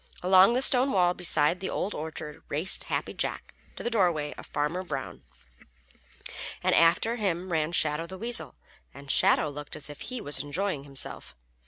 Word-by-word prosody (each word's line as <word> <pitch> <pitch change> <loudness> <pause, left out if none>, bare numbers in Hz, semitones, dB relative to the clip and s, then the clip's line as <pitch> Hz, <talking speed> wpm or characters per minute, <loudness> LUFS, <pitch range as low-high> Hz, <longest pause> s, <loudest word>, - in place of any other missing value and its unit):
Along 190 +4 +6
the 255 - +2
stone 260 +1 +5
wall 180 -2 +3
beside 175 -1 +3
the 190 - -4
Old 205 - -3
Orchard 155 -1 -7
raced 160 +7 +1
Happy - - -3
Jack - - -4 0.2
to - - -8
the 240 - -2
dooryard 175 -9 +1
of - - -11
Farmer 150 +5 -2
Brown, 140 -7 -6 1.4
and - - +2
after 175 +8 +3
him 185 -4 -2
ran 160 -1 0
Shadow 155 -1 +1
the 190 +2 -8
Weasel, 235 +4 0 0.4
and 140 -1 -6
Shadow - - +4
looked 145 0 -8
as 150 -1 -5
if 145 - -12
he 255 -1 -5
was 145 -8 0
enjoying 145 +1 -3
himself. 135 -1 -3
170 Hz, 170 wpm, -27 LUFS, 150-190 Hz, 1.4 s, Along